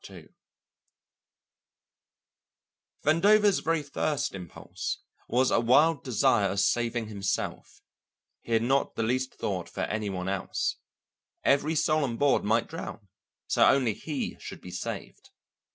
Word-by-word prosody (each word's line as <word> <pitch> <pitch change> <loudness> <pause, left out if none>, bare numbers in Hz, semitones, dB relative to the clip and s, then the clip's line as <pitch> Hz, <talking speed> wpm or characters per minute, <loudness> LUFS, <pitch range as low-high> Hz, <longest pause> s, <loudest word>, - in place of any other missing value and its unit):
Vandover's 200 +6 +4
very 165 -2 0
first 145 0 -1
impulse 90 -4 -6 0.3
was 130 +2 +2
a - - +4
wild 140 +7 +4
desire 110 -4 +2
of 100 +2 -1
saving 115 +2 +1
himself; 100 -2 -4 0.6
he 115 - -4
had 115 0 +3
not 135 +3 +1
the 115 - -1
least 130 +3 -1
thought - - -3
for - - -5
any 105 -1 -2
one 90 -1 -4
else. 95 0 -2 0.7
Every 145 +3 +2
soul 155 0 +2
on 120 -4 -2
board 145 +1 +3
might 115 +3 +1
drown, 135 -10 -8 0.4
so - - +2
only 130 -5 +3
he 145 +4 -4
should - - -8
be - - -10
saved. - - -6
125 Hz, 125 wpm, -28 LUFS, 110-150 Hz, 0.7 s, Vandover's